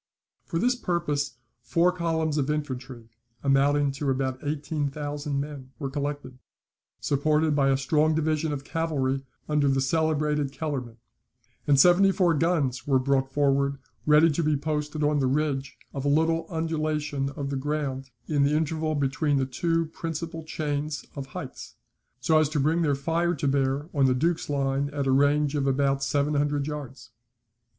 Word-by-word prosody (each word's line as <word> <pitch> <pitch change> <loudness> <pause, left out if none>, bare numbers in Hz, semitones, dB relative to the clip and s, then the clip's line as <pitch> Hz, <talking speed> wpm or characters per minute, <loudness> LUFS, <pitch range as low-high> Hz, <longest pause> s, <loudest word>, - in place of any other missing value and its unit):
For 165 - -3
this 245 +8 +3
purpose 150 - -2 0.2
four 175 +2 +2
columns 160 -3 -1
of 140 0 -1
infantry, 130 -6 -4 0.3
amounting 140 +1 +3
to 140 +1 -3
about 130 -1 -1
eighteen 145 0 -2
thousand 145 0 -3
men, 140 -2 -7
were 140 -4 -4
collected, 145 -2 -4 0.6
supported 150 +2 +1
by 135 -1 +3
a 135 - +3
strong 155 +3 +2
division 155 0 0
of 140 -2 -4
cavalry 140 -5 -1 0.3
under 150 -2 +2
the 135 0 +2
celebrated 150 0 +1
Kellerman; 135 -5 -4 0.7
and 140 -2 +5
seventy 180 +5 +6
four 180 -3 +3
guns 150 -6 0
were 135 -2 +4
brought 135 0 +1
forward 140 0 +2 0.3
ready 155 +2 +6
to 150 - -1
be 155 -2 +2
posted 150 +1 -2
on 145 0 +2
the 135 - +2
ridge 140 0 -1 0.2
of 135 - -4
a - - -1
little 165 +2 +2
undulation 155 -4 -1
of 140 -1 -4
the - - -1
ground 135 -1 -3 0.2
in 145 -2 0
the 140 +2 +3
interval 155 0 -1
between 145 +1 +1
the 135 - +1
two 165 +6 0
principal 165 +1 -5
chains 150 -1 -3
of 140 -2 -5
heights, 135 - -8 0.4
so 155 +5 +3
as 155 -2 +2
to 155 -1 -1
bring 155 +5 +2
their 145 -4 +2
fire 165 +5 0
to 145 - -2
bear 135 +1 +1
on 140 -3 +3
the 130 - +2
Duke's 165 +5 0
line 140 0 0
at 145 -1 -3
a 135 - +2
range 145 +2 +3
of 140 -2 0
about 135 0 +1
seven 145 +2 +1
hundred 145 -1 +1
yards. 145 -5 -7
145 Hz, 165 wpm, -26 LUFS, 135-155 Hz, 0.7 s, seventy